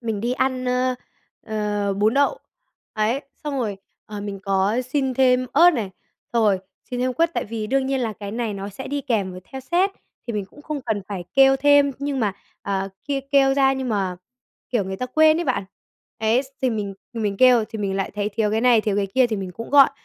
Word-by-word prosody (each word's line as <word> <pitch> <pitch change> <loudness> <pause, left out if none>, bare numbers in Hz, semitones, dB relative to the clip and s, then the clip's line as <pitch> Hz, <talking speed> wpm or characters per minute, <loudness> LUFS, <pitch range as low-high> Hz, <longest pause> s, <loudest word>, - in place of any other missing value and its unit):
mình 225 -4 -3
đi 240 +2 -1
ăn, 260 -1 0
ơ, 250 0 +1 0.5
ờ, 210 -2 -1
bún 215 +5 +2
đậu, 285 - +2 0.5
ấy. 220 +5 0 0.2
Xong 285 -2 -2
rồi, 205 -4 -2 0.3
ờ, 210 -1 -6
mình 200 -1 -5
có 195 +2 +1
xin 265 -3 0
thêm 255 -1 +3
ớt 340 +5 +7
này, 225 - -3 0.4
xong 230 -2 +3
rồi 195 -3 +3 0.3
xin 245 - -2
thêm 255 0 +1
quất, 330 +4 +2
tại - - -1
vì 220 0 -4
đương 265 +2 +1
nhiên 270 -1 0
là 225 -3 -1
cái 205 -1 -7
này 225 -2 -2
nó 195 +1 -5
sẽ 235 +7 -8
đi 285 0 -2
kèm 220 -8 -1
với 185 - -9
theo 265 - -8
set 355 +8 +1 0.4
thì 235 - -3
mình 205 -2 -2
cũng 290 +9 -17
không 300 -2 -4
cần 220 -5 -2
phải 185 -4 -5
kêu 270 0 +6
thêm, 285 0 +4
nhưng 280 -2 -2
mà, 205 -3 +1 0.3
ờ, 195 -1 -2 0.2
kia 280 -1 -1
kêu 270 -1 +5
ra 270 -1 +4
nhưng 265 -1 -3
mà, 195 -4 -1 0.5
kiểu, 230 -6 +1
người 190 0 -4
ta 250 - -3
quên 310 +4 +4
ấy 345 - -1
bạn. 255 - 0 0.5
Ấy, 225 +4 +2
s 275 - -13 0.2
thì 255 - +3
mình 205 -3 -3 0.2
mình 210 -4 -2
kêu 250 -1 +6
thì 220 - -6
mình 195 -2 -1
lại 195 - -2
thấy 205 0 -1
thiếu 215 0 0
cái 220 +1 +1
này, 245 -2 +5
thiếu 210 -2 -1
cái 200 -1 +1
kia 250 +6 +3
thì 220 - -2
mình 190 -2 -5
cũng 230 +6 -8
gọi, 280 -2 +7
235 Hz, 235 wpm, -23 LUFS, 205-270 Hz, 0.5 s, ớt